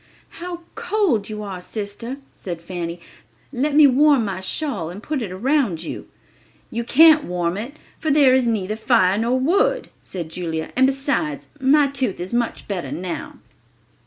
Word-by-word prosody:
"How 350 -1 -5
cold 345 - 0
you 210 0 -5
are, 190 -3 -6
sister," 215 +6 -6 0.2
said 175 -3 -6
Fanny; 170 0 -5 0.5
"let 285 +3 0
me 300 0 +8
warm 280 -2 +5
my 195 -2 -3
shawl 190 - -3
and 195 +5 -9
put 300 -4 -2
it 205 -5 -4
around 225 - 0
you." - - -6 0.6
"You 235 +1 -2
can't 310 +4 +6
warm 175 -1 -1
it, 235 +8 -5 0.2
for 315 - -1
their 280 -3 +5
is 260 -2 +3
neither 215 -2 -1
fire 220 -4 +3
nor 240 +3 +1
wood," 395 - +1
said 170 -4 -6
Julia; 160 -2 -4
"and 260 +1 +5
besides, 275 +3 -1
my 285 +2 +5
tooth 265 -8 -1
is 180 +4 -5
much 240 -1 -1
better 190 -4 -3
now." 180 -1 -5
235 Hz, 160 wpm, -21 LUFS, 185-280 Hz, 0.6 s, me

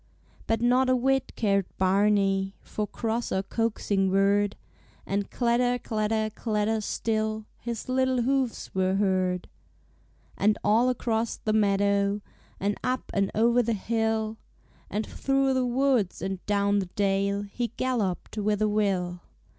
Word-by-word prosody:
But 225 0 +1
not 250 +2 +3
a 255 - +4
whit 270 +1 +1
cared 200 -4 +1
Barney 195 0 +2
For 210 -1 -3
cross 230 +3 -2
or 190 - 0
coaxing 205 -2 0
word; 200 +1 +2 0.5
And 200 0 -2
clatter, 245 0 +1
clatter, 215 -2 -1
clatter 220 -1 0
still, 215 0 -1
His 235 -2 -5
little 260 -1 +1
hoofs 265 -1 -1
were 190 0 +1
heard. 185 -2 +1 0.9
And 210 +1 +3
all 225 +5 +4
across 230 -2 -1
the 215 - -2
meadow, 200 -1 +2 0.4
And 200 +1 -1
up 255 +1 -2
and 195 -1 +1
o'er 235 +3 +4
the 230 -1 0
hill, 220 +1 -1 0.5
And 210 +1 -2
through 270 0 +1
the 260 -1 +1
woods 245 -6 +1
and 190 -1 -4
down 200 0 +2
the 190 - -3
dale 200 +1 0
He 235 +4 -3
galloped 220 -5 -1
with 210 0 +1
a - - +3
will. 190 -4 0
215 Hz, 140 wpm, -27 LUFS, 200-235 Hz, 0.9 s, a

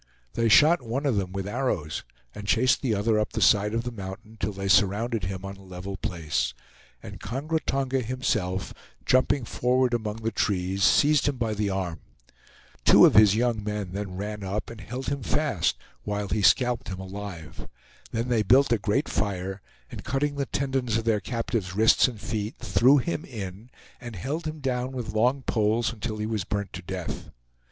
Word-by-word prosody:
They 115 -1 +1
shot 155 +7 +6
one 125 +5 -3
of 135 -5 +2
them 95 -2 -1
with 95 0 -4
arrows 100 - -2 0.3
and 105 - -8
chased 130 +5 +3
the 120 -6 +1
other 105 +2 +2
up 105 - -2
the 110 - -1
side 105 0 +4
of 115 - 0
the 120 - -4
mountain 105 +1 -8
till 105 0 -1
they 100 0 -5
surrounded 105 +1 +2
him 95 0 -5
on 95 0 -7
a 100 - -15
level 95 +1 -7
place, 80 -9 -2 0.5
and - - -9
Kongra 150 +6 -2
Tonga 135 -1 0
himself, 110 -7 -2 0.3
jumping 130 0 +3
forward 125 +2 +1
among 110 -3 -1
the 115 0 -3
trees, 95 -2 0
seized 150 0 +4
him 140 -2 0
by 115 -3 -1
the 105 -1 -1
arm. 95 -4 -3 0.8
Two - - +8
of - - +5
his 105 -2 +7
young 115 -2 0
men 105 -3 -3
then 95 -1 -5
ran 105 +1 -5
up 100 +4 -3
and 115 -2 -10
held 125 +5 -5
him 140 -1 -2
fast 125 - 0 0.3
while 105 -1 -3
he 105 +3 0
scalped 125 +3 +3
him 95 -1 -5
alive. 95 -4 -8 0.4
Then 115 +2 -2
they 120 -3 +2
built 130 +6 +4
a 115 - +3
great - - 0
fire, 95 +1 -2 0.3
and - - -8
cutting 145 +2 -1
the 140 -2 -2
tendons 130 -5 -1
of 115 - -2
their 110 -2 +2
captive's 115 -4 -3
wrists 110 +5 +5
and 120 -4 -7
feet, 105 0 -3
threw 120 +5 +4
him 155 +3 -2
in, 105 - -8 0.3
and 120 -3 -8
held 150 - -3
him 155 -1 -6
down 130 -1 -2
with 120 -4 -5
long 125 +5 +2
poles 110 +1 +1
until 110 0 -4
he 105 - -2
was 110 -3 -2
burnt 100 0 -3
to 95 - -6
death. 90 -1 -6
110 Hz, 190 wpm, -26 LUFS, 100-125 Hz, 0.8 s, Two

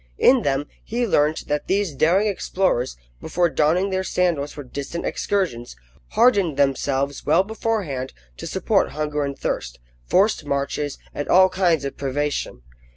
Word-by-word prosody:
In 255 -1 +5
them, 140 -3 0 0.2
he 240 +2 -1
learnt 155 -7 +1
that 150 0 -2
these 195 -4 0
daring 170 +9 +3
explorers, 185 - 0 0.2
before 175 -1 0
donning 175 +7 +2
their 190 0 0
sandals 170 -6 0
for 145 - -8
distant 140 +6 -5
excursions, 145 - -2 0.4
hardened 205 - +3
themselves 140 0 0
well 165 +5 +3
beforehand 200 - -3 0.3
to - - -6
support - - +1
hunger 150 -1 -2
and 140 -1 -4
thirst, - - -3 0.3
forced 195 -3 +3
marches, 140 0 -2 0.2
and 145 - -4
all 185 +1 +6
kinds 170 -7 +1
of 140 - -5
privation. 140 - -2
155 Hz, 145 wpm, -22 LUFS, 140-190 Hz, 0.4 s, all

